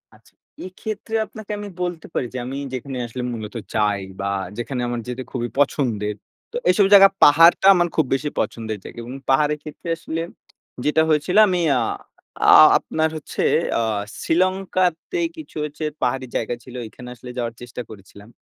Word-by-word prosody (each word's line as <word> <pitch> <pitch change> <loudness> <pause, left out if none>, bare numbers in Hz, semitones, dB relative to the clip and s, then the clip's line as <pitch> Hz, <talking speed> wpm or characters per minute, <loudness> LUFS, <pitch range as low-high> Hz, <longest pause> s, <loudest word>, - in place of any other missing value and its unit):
আচ্ছা, - - -24 0.3
এক্ষেত্রে 215 +4 -6
আপনাকে 215 -1 -10
আমি 205 -1 -6
বলতে 175 -2 -3
পারি - - -1
যে - - -4
আমি 135 +2 -5 0.2
যেখানে 130 +1 -5
আসলে 125 +2 -6
মূলত 110 0 -7 0.2
যাই 105 -2 +1 0.2
বা, 100 - -3 0.3
যেখানে 125 +1 -3
আমার 120 -1 -2
যেতে 125 +1 -4
খুবই 120 -2 -3
পছন্দের। 115 -7 0 0.4
তো 475 - -3
এইসব 205 -3 +5
জায়গা 195 -1 +10
পাহাড়টা 165 +5 +7
আমার 175 -1 +2
খুব 160 - +3
বেশি 140 +2 -1
পছন্দের 110 0 -3
জায়গা - - -11
এবং 125 +3 -8
পাহাড়ের 150 +2 +3
ক্ষেত্রে 155 +2 -8
আসলে 165 0 -4 0.6
যেটা 150 +1 +3
হয়েছিল, 155 +6 +1
আমি 180 -2 +1 0.2
আ - - +2 0.7
আ - - +10 0.3
আপনার 160 0 -1
হচ্ছে 155 - -4 0.4
আ - - +1 0.4
শ্রীলঙ্কাতে 185 - 0 0.2
কিছু 315 - -11
হচ্ছে 150 +1 -6 0.2
পাহাড়ি 130 +1 0
জায়গা 120 +1 -1
ছিল। 125 - -12
এখানে 125 +3 -12
আসলে 125 +1 -11
যাওয়ার 115 -1 -2
চেষ্টা 120 0 -7
করেছিলাম। 100 0 -14
140 Hz, 165 wpm, -22 LUFS, 120-175 Hz, 0.7 s, জায়গা